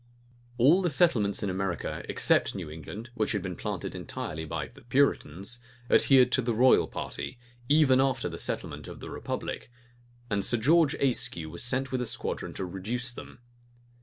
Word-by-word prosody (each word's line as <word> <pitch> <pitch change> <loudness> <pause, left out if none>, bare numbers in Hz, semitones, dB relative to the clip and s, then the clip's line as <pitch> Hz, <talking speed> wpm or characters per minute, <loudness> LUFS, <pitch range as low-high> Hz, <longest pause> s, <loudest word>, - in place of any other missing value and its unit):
All 150 +10 +5
the 180 - +1
settlements 115 - +2
in 100 - 0
America, 95 -2 -3
except - - +3
New 75 - -6
England, 105 +10 -8
which 125 - -1
had 100 -3 -2
been 90 -2 -4
planted - - -4
entirely 80 +1 -5
by - - -4
the - - -17
Puritans, 120 - 0 0.3
adhered 130 -2 +6
to 130 - +3
the 120 -2 -1
royal 125 +3 +5
party, 125 - -6 0.3
even 145 -3 +5
after 130 -2 0
the - - -5
settlement - - -3
of - - -9
the - - -8
republic; - - -5 0.6
and 100 -4 -1
Sir 120 - +2
George 155 +5 +4
Ayscue 85 - -1
was 85 - -7
sent 130 +2 0
with 130 -1 -1
a 125 - -2
squadron - - -3
to 95 - -3
reduce 110 +8 -3
them. 120 - -11
120 Hz, 170 wpm, -28 LUFS, 95-130 Hz, 0.6 s, adhered